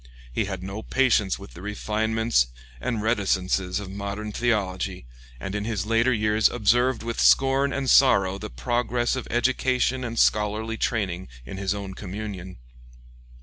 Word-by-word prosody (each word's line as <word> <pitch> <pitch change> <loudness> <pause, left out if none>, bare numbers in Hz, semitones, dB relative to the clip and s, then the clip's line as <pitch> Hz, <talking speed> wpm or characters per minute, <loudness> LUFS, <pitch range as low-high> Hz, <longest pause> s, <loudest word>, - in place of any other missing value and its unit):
He - - 0
had 95 -2 -5
no 95 +3 -5
patience 115 -6 +2
with 100 0 -12
the 85 - -11
refinements 110 - 0 0.3
and 110 - -2
reticences 95 -4 0
of 100 -2 -7
modern 100 +2 -5
theology, 100 - -1 0.3
and 95 +7 -5
in 105 0 -2
his 105 -3 -2
later 115 +3 +3
years 110 -1 +3
observed 120 +2 +2
with 115 0 -2
scorn 135 +1 +4
and 140 -1 -2
sorrow 100 -9 +5
the - - -6
progress 120 - 0
of 130 - -5
education 130 +1 +1
and 115 -1 -4
scholarly 105 +2 +1
training 95 -7 -1 0.2
in 80 - -7
his 100 +1 -1
own 100 -2 -6
communion. 95 -1 -7
105 Hz, 145 wpm, -25 LUFS, 95-120 Hz, 0.3 s, sorrow